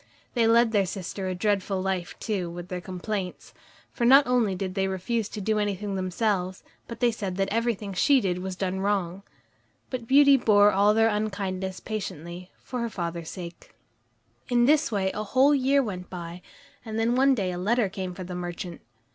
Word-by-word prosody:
They 235 Hz, -3 st, +3 dB
led 230 Hz, 0 st, +5 dB
their 200 Hz, -4 st, +2 dB
sister 190 Hz, +1 st, -5 dB
a 185 Hz, -, -2 dB
dreadful 200 Hz, 0 st, 0 dB
life 185 Hz, -2 st, -3 dB
too, 195 Hz, -6 st, -2 dB
with 175 Hz, +1 st, -8 dB
their 180 Hz, -1 st, -4 dB
complaints, 185 Hz, +1 st, -5 dB, 0.4 s
for 240 Hz, -, -4 dB
not 270 Hz, +4 st, +7 dB
only 240 Hz, -6 st, +2 dB
did 185 Hz, 0 st, -4 dB
they 195 Hz, 0 st, 0 dB
refuse 205 Hz, +4 st, -2 dB
to -, -, -6 dB
do 215 Hz, +2 st, +1 dB
anything 205 Hz, -1 st, -2 dB
themselves, 185 Hz, 0 st, -1 dB, 0.2 s
but 230 Hz, +1 st, -9 dB
they 240 Hz, -1 st, +4 dB
said 200 Hz, -5 st, -4 dB
that 195 Hz, 0 st, 0 dB
everything 225 Hz, -3 st, -1 dB
she 275 Hz, +9 st, +4 dB
did 180 Hz, -5 st, -1 dB
was 185 Hz, 0 st, -4 dB
done 190 Hz, 0 st, -2 dB
wrong. 195 Hz, -2 st, -1 dB, 0.7 s
But 245 Hz, -3 st, -4 dB
Beauty 280 Hz, +1 st, +7 dB
bore 210 Hz, -4 st, +5 dB
all 205 Hz, +2 st, +4 dB
their 225 Hz, 0 st, +4 dB
unkindness 195 Hz, -3 st, -2 dB
patiently, 180 Hz, -4 st, -6 dB
for 250 Hz, -, -5 dB
her 235 Hz, 0 st, -1 dB
father's 170 Hz, -4 st, -4 dB
sake. 175 Hz, -, -9 dB, 0.7 s
In 240 Hz, -1 st, +4 dB
this 300 Hz, +1 st, +3 dB
way 190 Hz, -3 st, 0 dB
a 210 Hz, -, -4 dB
whole 265 Hz, +7 st, +4 dB
year 275 Hz, 0 st, +3 dB
went 185 Hz, -5 st, -6 dB
by, 175 Hz, -1 st, -7 dB, 0.4 s
and 220 Hz, -1 st, -5 dB
then 225 Hz, +1 st, +2 dB
one 270 Hz, +1 st, +4 dB
day 190 Hz, -5 st, -1 dB
a 175 Hz, -, -4 dB
letter 220 Hz, +4 st, +2 dB
came 185 Hz, -1 st, -5 dB
for 185 Hz, -, -6 dB
the 180 Hz, 0 st, -7 dB
merchant. 175 Hz, -1 st, -6 dB
200 Hz, 190 wpm, -26 LUFS, 185-230 Hz, 0.7 s, not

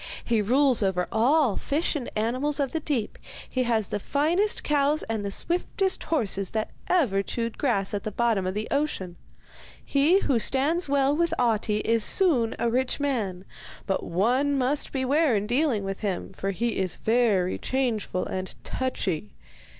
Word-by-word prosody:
He 230 Hz, -3 st, +1 dB
rules 255 Hz, +4 st, +3 dB
over 185 Hz, -3 st, 0 dB
all 245 Hz, +1 st, +3 dB
fish 310 Hz, +4 st, 0 dB
and 265 Hz, -5 st, -3 dB
animals 255 Hz, +7 st, 0 dB
of 275 Hz, -2 st, 0 dB
the 320 Hz, -, -1 dB
deep; 270 Hz, -8 st, -3 dB, 0.3 s
he 255 Hz, -, -1 dB
has 225 Hz, -4 st, 0 dB
the 205 Hz, -, -2 dB
finest 330 Hz, -, +1 dB
cows 295 Hz, +1 st, +2 dB
and 220 Hz, -2 st, -3 dB
the 200 Hz, -, -2 dB
swiftest 360 Hz, -, -1 dB
horses 200 Hz, -, 0 dB
that 215 Hz, -, -2 dB, 0.2 s
ever 255 Hz, -, +2 dB
chewed 230 Hz, +3 st, -4 dB
grass 205 Hz, -9 st, 0 dB
at 205 Hz, -, -1 dB
the -, -, -2 dB
bottom 215 Hz, -3 st, 0 dB
of 185 Hz, -, -3 dB
the 215 Hz, +1 st, -2 dB
ocean. 275 Hz, -12 st, -1 dB, 0.7 s
He 310 Hz, +8 st, +3 dB
who 255 Hz, -5 st, +1 dB
stands 290 Hz, +8 st, +1 dB
well 280 Hz, 0 st, +2 dB
with 335 Hz, +1 st, +1 dB
Ahti 220 Hz, -3 st, +1 dB
is 230 Hz, -1 st, +1 dB
soon 275 Hz, -, +2 dB
a -, -, 0 dB
rich 255 Hz, +4 st, 0 dB
man, 215 Hz, -10 st, -2 dB, 0.4 s
but 195 Hz, -, -1 dB
one 250 Hz, +11 st, +1 dB
must 270 Hz, +3 st, +1 dB
beware 275 Hz, 0 st, +2 dB
in 205 Hz, 0 st, 0 dB
dealing 245 Hz, -2 st, +1 dB
with 195 Hz, 0 st, -4 dB
him, 195 Hz, -3 st, -3 dB
for 195 Hz, +1 st, -3 dB
he 225 Hz, +4 st, -1 dB
is 185 Hz, -3 st, -1 dB
very 220 Hz, -6 st, +1 dB
changeful 235 Hz, -8 st, -1 dB
and 185 Hz, 0 st, -5 dB
touchy. 185 Hz, -, -3 dB
240 Hz, 165 wpm, -26 LUFS, 205-285 Hz, 0.7 s, rules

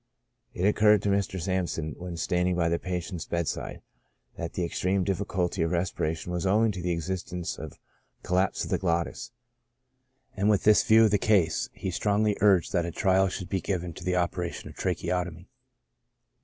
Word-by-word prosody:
It 90 Hz, -, -3 dB
occur 105 Hz, +1 st, +5 dB
red 105 Hz, -1 st, +1 dB
to 100 Hz, -, +1 dB
Mr. 100 Hz, -1 st, 0 dB
Sampson, 90 Hz, -4 st, -2 dB
when 90 Hz, -1 st, -7 dB
standing 90 Hz, +1 st, 0 dB
by 85 Hz, -1 st, +1 dB
the 85 Hz, 0 st, 0 dB
patient's 90 Hz, -2 st, -4 dB
bed 85 Hz, -2 st, -1 dB
side, -, -, -4 dB, 0.5 s
that 85 Hz, -1 st, -5 dB
the 90 Hz, -, -1 dB
extreme 95 Hz, +3 st, 0 dB
difficulty 95 Hz, -2 st, -1 dB
of 80 Hz, -, +1 dB
respiration 85 Hz, -1 st, -2 dB
was 90 Hz, -1 st, -2 dB
owing 105 Hz, +3 st, +3 dB
to 95 Hz, -3 st, -6 dB
the 90 Hz, -, -2 dB
existence 90 Hz, +1 st, -3 dB
of 80 Hz, -2 st, -8 dB, 0.5 s
'collapse 90 Hz, +1 st, +1 dB
of -, -, -6 dB
the -, -, +1 dB
glottis,' 85 Hz, +3 st, -1 dB, 1.1 s
and 100 Hz, +1 st, +1 dB
with 105 Hz, -2 st, +3 dB
this 105 Hz, 0 st, +6 dB
view 110 Hz, +1 st, +6 dB
of 110 Hz, -, +4 dB
the 105 Hz, -, +3 dB
case, 90 Hz, -8 st, +2 dB
he 95 Hz, -, -5 dB
strongly 105 Hz, +3 st, +1 dB
uiged 95 Hz, -5 st, +4 dB
that 85 Hz, -3 st, +1 dB
a -, -, -4 dB
trial 95 Hz, +2 st, +3 dB
should 90 Hz, -1 st, -5 dB
be 95 Hz, -2 st, -1 dB
given 90 Hz, -2 st, -3 dB
to 85 Hz, -, -10 dB
the 90 Hz, 0 st, 0 dB
operation 90 Hz, -1 st, -2 dB
of -, -, -17 dB
tracheotomy. 90 Hz, -1 st, -2 dB
90 Hz, 185 wpm, -27 LUFS, 85-95 Hz, 1.1 s, this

